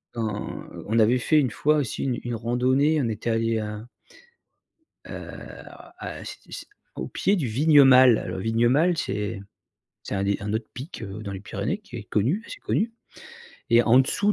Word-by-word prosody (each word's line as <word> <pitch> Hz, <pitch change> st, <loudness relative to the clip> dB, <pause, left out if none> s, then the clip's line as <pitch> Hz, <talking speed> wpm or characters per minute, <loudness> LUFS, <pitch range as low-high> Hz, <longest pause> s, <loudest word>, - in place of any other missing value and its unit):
On 110 Hz, -3 st, -4 dB, 0.2 s
on 110 Hz, +2 st, +1 dB
avait 115 Hz, +3 st, +4 dB
fait 155 Hz, +5 st, +3 dB
une 130 Hz, -, +1 dB
fois 150 Hz, +5 st, +2 dB
aussi 140 Hz, -6 st, -2 dB
une 125 Hz, -3 st, -1 dB
une 120 Hz, -1 st, -3 dB
randonnée, 130 Hz, +6 st, +2 dB
on 120 Hz, -, 0 dB
était 110 Hz, +1 st, -3 dB
allés 115 Hz, 0 st, +1 dB
à 105 Hz, +2 st, -6 dB, 1.2 s
heu, -, -, -8 dB, 0.3 s
alors -, -, -13 dB
a -, -, -7 dB
c'ét -, -, -8 dB
c'é -, -, -7 dB, 0.3 s
au -, -, -4 dB
pied 200 Hz, -, +1 dB
du 150 Hz, -9 st, -1 dB
Vignemale. 130 Hz, -1 st, +6 dB
Le -, -, -4 dB
Vignemale 120 Hz, -, +2 dB
c'est 105 Hz, -3 st, -3 dB, 0.6 s
c'est -, -, -6 dB
un 95 Hz, -, -1 dB
des 100 Hz, 0 st, +1 dB
un 105 Hz, +1 st, -4 dB
autre 110 Hz, 0 st, -2 dB
pic, 130 Hz, +1 st, -8 dB
heu, 105 Hz, +1 st, -7 dB
dans 100 Hz, -, -5 dB
les 95 Hz, -, -6 dB
Pyrénées 165 Hz, -, -3 dB
qui 205 Hz, -12 st, -12 dB
est 115 Hz, -, -7 dB
connu, 125 Hz, -, 0 dB
assez -, -, -9 dB
connu 225 Hz, +2 st, -1 dB, 0.8 s
et 120 Hz, +1 st, +6 dB
en 120 Hz, +3 st, +5 dB
dessous 205 Hz, +10 st, +1 dB
120 Hz, 185 wpm, -25 LUFS, 110-140 Hz, 1.2 s, Vignemale